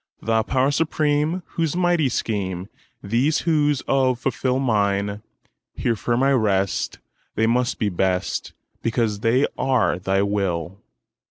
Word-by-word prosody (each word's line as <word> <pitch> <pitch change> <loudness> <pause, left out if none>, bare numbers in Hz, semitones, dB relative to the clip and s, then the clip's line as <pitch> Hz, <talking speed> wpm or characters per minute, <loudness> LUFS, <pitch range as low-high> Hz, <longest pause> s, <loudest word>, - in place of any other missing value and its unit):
Thou 110 0 +1
Power 130 +4 +1
Supreme, 155 +2 0
whose 165 -2 -1
mighty 175 -5 +2
schemeThese 105 - -2
woes 150 -4 +2
of 130 -2 +2 0.4
mine 105 -6 +2
fulfil, 100 +1 -6 0.5
Here 115 - 0
firm 120 +4 0
I 135 - +4
rest; 100 -6 +1 0.4
they 110 - +2
must 120 +2 +1
be 105 - 0
best, 90 0 -1 0.3
Because 115 -3 0
they 120 +6 +3
are 130 -9 +2
Thy 95 +1 +1
will! 95 -3 -2
115 Hz, 120 wpm, -22 LUFS, 100-140 Hz, 0.5 s, I